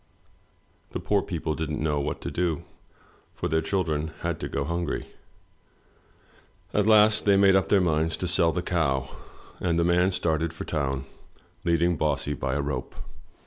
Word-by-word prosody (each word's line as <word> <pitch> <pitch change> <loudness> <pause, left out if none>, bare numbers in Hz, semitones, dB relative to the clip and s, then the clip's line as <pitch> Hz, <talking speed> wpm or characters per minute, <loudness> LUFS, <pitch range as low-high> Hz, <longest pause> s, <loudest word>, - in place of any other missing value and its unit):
The - - -2
poor 100 -1 +1
people 80 -4 -3
didn't 75 -1 -3
know 75 -1 0
what 70 - -3
to - - -4
do, 85 -4 -1 0.7
for - - -2
their 80 +1 +1
children 80 -3 -1
had - - -2
to - - -4
go 70 - -1
hungry. 85 +2 -2 1.7
At 105 0 +2
last 110 0 +5
they 100 -1 +5
made 100 -1 +6
up 95 - +2
their 100 - +5
minds 80 -2 +1
to 90 - -2
sell 85 -1 +3
the 90 +2 -2
cow, 70 -7 0 0.5
and 85 -2 0
the 85 - +3
man 90 +2 +3
started 80 -3 0
for 80 - -6
town 70 -4 -2 0.6
leading 85 0 +2
Bossy 75 -1 0
by 65 -2 -2
a 75 - 0
rope. 65 -3 -4
80 Hz, 165 wpm, -26 LUFS, 75-90 Hz, 1.7 s, made